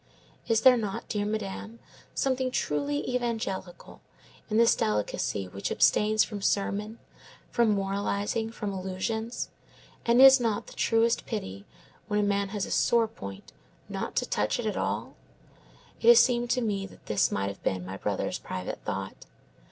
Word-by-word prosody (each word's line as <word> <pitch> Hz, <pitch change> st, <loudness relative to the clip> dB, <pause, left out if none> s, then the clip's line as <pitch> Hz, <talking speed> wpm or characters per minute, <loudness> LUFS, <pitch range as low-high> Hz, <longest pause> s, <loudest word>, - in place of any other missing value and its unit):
Is 225 Hz, -1 st, +3 dB
there 255 Hz, 0 st, +7 dB
not, 210 Hz, -4 st, -4 dB
dear 205 Hz, -1 st, -1 dB
Madame, 215 Hz, +1 st, -4 dB, 0.4 s
something 260 Hz, -1 st, 0 dB
truly 145 Hz, -, -1 dB
evangelical 220 Hz, -7 st, -4 dB, 0.5 s
in 215 Hz, -, +1 dB
this 230 Hz, 0 st, +5 dB
delicacy 105 Hz, -2 st, -1 dB
which 100 Hz, +2 st, -5 dB
abstains 215 Hz, 0 st, +4 dB
from 205 Hz, -2 st, -6 dB
sermon, 205 Hz, +2 st, -1 dB, 0.5 s
from 235 Hz, -2 st, +3 dB
moralizing, 200 Hz, +3 st, -1 dB
from 210 Hz, -3 st, -5 dB
allusions? 195 Hz, +5 st, -3 dB, 0.5 s
and 235 Hz, +1 st, +3 dB
is 270 Hz, 0 st, +9 dB
not 225 Hz, -4 st, -1 dB
the -, -, -12 dB
truest 230 Hz, +1 st, +1 dB
pity, 100 Hz, -, -5 dB, 0.4 s
when 210 Hz, -1 st, 0 dB
a -, -, +2 dB
man 200 Hz, -1 st, 0 dB
has 205 Hz, -1 st, -2 dB
a -, -, -8 dB
sore 235 Hz, -1 st, +3 dB
point, 100 Hz, -, -10 dB, 0.4 s
not -, -, -4 dB
to -, -, +1 dB
touch -, -, 0 dB
it -, -, -3 dB
at -, -, -1 dB
all? -, -, -2 dB, 0.9 s
It -, -, 0 dB
has 235 Hz, -1 st, +10 dB
seemed 240 Hz, -1 st, +3 dB
to 250 Hz, +1 st, +1 dB
me 200 Hz, -4 st, -1 dB
that -, -, -18 dB
this 105 Hz, -2 st, +1 dB
might 100 Hz, 0 st, -1 dB
have 100 Hz, -, -9 dB
been 95 Hz, -1 st, -1 dB
my 95 Hz, +1 st, -6 dB
brother's 100 Hz, 0 st, -2 dB
private 90 Hz, 0 st, -5 dB
thought. -, -, -5 dB
210 Hz, 160 wpm, -28 LUFS, 185-230 Hz, 0.9 s, has